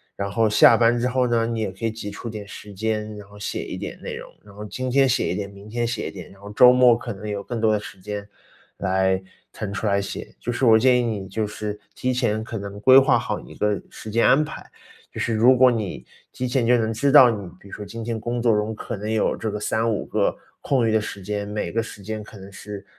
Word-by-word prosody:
然 100 Hz, 0 st, -3 dB
后 110 Hz, +2 st, +2 dB
下 105 Hz, -, +7 dB
班 120 Hz, +1 st, +3 dB
之 120 Hz, -, +1 dB
后 125 Hz, 0 st, +1 dB
呢， 115 Hz, -1 st, +1 dB
你 115 Hz, -1 st, -2 dB
也 105 Hz, -, -2 dB
可 95 Hz, +4 st, -14 dB
以 115 Hz, -, 0 dB
挤 110 Hz, -2 st, -7 dB
出 115 Hz, +3 st, -7 dB
点 105 Hz, -2 st, -7 dB
时 105 Hz, +1 st, -10 dB
间， 105 Hz, +1 st, -3 dB
然 105 Hz, -1 st, -11 dB
后 105 Hz, 0 st, -15 dB
写 100 Hz, -, -3 dB
一 -, -, -6 dB
点 -, -, -7 dB
内 -, -, -6 dB
容， -, -, -9 dB
然 100 Hz, -, -15 dB
后 105 Hz, -, -8 dB
今 130 Hz, +4 st, -4 dB
天 135 Hz, +1 st, +4 dB
写 125 Hz, +1 st, +1 dB
一 -, -, -2 dB
点， 100 Hz, -1 st, -4 dB
明 100 Hz, +1 st, -13 dB
天 120 Hz, +1 st, -1 dB
写 115 Hz, -2 st, -3 dB
一 -, -, -10 dB
点， 90 Hz, -4 st, -10 dB
然 95 Hz, -, -17 dB
后 100 Hz, 0 st, -9 dB
周 125 Hz, +4 st, +7 dB
末 125 Hz, -1 st, +6 dB
可 120 Hz, 0 st, -6 dB
能 105 Hz, +2 st, -8 dB
有 100 Hz, -1 st, -3 dB
更 120 Hz, +2 st, -4 dB
多 110 Hz, -1 st, +3 dB
的 105 Hz, -, +1 dB
时 100 Hz, -2 st, -11 dB
间 105 Hz, +1 st, -6 dB, 0.5 s
来 95 Hz, 0 st, +1 dB, 0.3 s
腾 100 Hz, -2 st, -5 dB
出 110 Hz, -, -2 dB
来 100 Hz, -1 st, +2 dB
写， -, -, -7 dB
就 120 Hz, -, -3 dB
是 120 Hz, -, -3 dB
我 110 Hz, -2 st, +7 dB
建 125 Hz, +1 st, +4 dB
议 -, -, +1 dB
你， 105 Hz, -5 st, -3 dB
就 110 Hz, +3 st, -2 dB
是 105 Hz, 0 st, -5 dB, 0.2 s
提 130 Hz, 0 st, -1 dB
前 110 Hz, -4 st, 0 dB
可 115 Hz, 0 st, -6 dB
能 100 Hz, 0 st, -7 dB
规 130 Hz, +5 st, +7 dB
划 130 Hz, -2 st, +4 dB
好 110 Hz, -2 st, -3 dB
一 -, -, -13 dB
个 105 Hz, -1 st, 0 dB
时 110 Hz, -, -10 dB
间 115 Hz, +2 st, +2 dB
安 145 Hz, +3 st, +5 dB
排， 155 Hz, -, -8 dB, 0.5 s
就 -, -, -7 dB
是 115 Hz, -, 0 dB
如 120 Hz, +4 st, +5 dB
果 130 Hz, 0 st, +6 dB
你 110 Hz, -6 st, -4 dB, 0.3 s
提 125 Hz, -, -3 dB
前 125 Hz, -1 st, +1 dB
就 125 Hz, 0 st, +5 dB
能 115 Hz, -1 st, 0 dB
知 140 Hz, +6 st, +1 dB
道 135 Hz, -4 st, +9 dB
你 100 Hz, -5 st, -5 dB
比 -, -, -16 dB
如 -, -, -13 dB
说 105 Hz, -, -6 dB
今 115 Hz, +2 st, -7 dB
天 115 Hz, 0 st, -3 dB
工 120 Hz, +2 st, -3 dB
作 115 Hz, -2 st, +3 dB
中 105 Hz, +1 st, -1 dB
可 -, -, -5 dB
能 105 Hz, +2 st, -5 dB
有 110 Hz, -1 st, +1 dB
这 110 Hz, -, -3 dB
个 105 Hz, -, -4 dB
3-5 110 Hz, 0 st, -1 dB
个 105 Hz, -2 st, 0 dB, 0.3 s
空 130 Hz, -5 st, +1 dB
余 -, -, +2 dB
的 110 Hz, 0 st, +2 dB
时 105 Hz, -, -6 dB
间， 100 Hz, +1 st, -3 dB
每 105 Hz, 0 st, -3 dB
个 115 Hz, -, 0 dB
时 105 Hz, -, -10 dB
间 110 Hz, +1 st, -5 dB
可 105 Hz, -, -13 dB
能 95 Hz, 0 st, -11 dB
是 100 Hz, 0 st, -9 dB
110 Hz, 290 characters per minute, -23 LUFS, 105-120 Hz, 0.5 s, 道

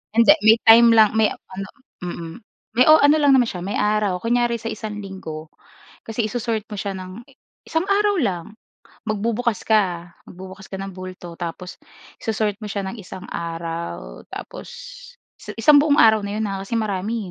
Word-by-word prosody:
Hindi, 230 Hz, +5 st, +7 dB
may 220 Hz, +1 st, +7 dB
time 230 Hz, +1 st, +8 dB
lang 215 Hz, -2 st, +6 dB
may 220 Hz, -1 st, +5 dB
ano 190 Hz, +1 st, -8 dB, 0.4 s
mm. 170 Hz, -2 st, -6 dB, 0.4 s
May 250 Hz, -, +6 dB
o 310 Hz, -1 st, +7 dB
ano 290 Hz, +2 st, +6 dB
lang 285 Hz, -2 st, +4 dB
naman 245 Hz, -3 st, +4 dB
siya, 180 Hz, -, -6 dB
may 200 Hz, -, -3 dB
araw, 210 Hz, -3 st, 0 dB
kunyari 240 Hz, 0 st, +1 dB
sa 230 Hz, -, -4 dB
isang 210 Hz, -1 st, -6 dB
linggo 160 Hz, -5 st, -8 dB, 0.5 s
kasi 225 Hz, 0 st, -3 dB
iso-sort 220 Hz, -1 st, -3 dB
mo 210 Hz, -, -8 dB
siya 200 Hz, -1 st, -4 dB
ng 185 Hz, +4 st, -9 dB, 0.5 s
isang 325 Hz, +3 st, 0 dB
araw 410 Hz, 0 st, +2 dB
lang. 185 Hz, -, -1 dB, 0.6 s
Magbubukas 225 Hz, +1 st, -1 dB
ka, 180 Hz, -6 st, 0 dB
magbubukas 190 Hz, +1 st, -11 dB
ka -, -, -7 dB
ng 195 Hz, 0 st, -6 dB
bulto 185 Hz, -2 st, -9 dB
tapos 180 Hz, +1 st, -7 dB, 0.4 s
iso-sort 215 Hz, -2 st, -1 dB
mo 215 Hz, -, -8 dB
siya 200 Hz, -1 st, -3 dB
ng 235 Hz, -, -8 dB
isang 190 Hz, 0 st, -10 dB
araw 165 Hz, -, -6 dB
tapos -, -, -9 dB, 0.8 s
i 210 Hz, -, -7 dB
isang 290 Hz, +4 st, +7 dB
buong 290 Hz, -1 st, +3 dB
araw 220 Hz, -1 st, +6 dB
na 200 Hz, +1 st, -4 dB
'yon 220 Hz, -, -2 dB
ha, 195 Hz, -, -4 dB
kasi 230 Hz, -, -4 dB
marami, 215 Hz, -1 st, -2 dB
210 Hz, 175 wpm, -21 LUFS, 185-230 Hz, 0.8 s, time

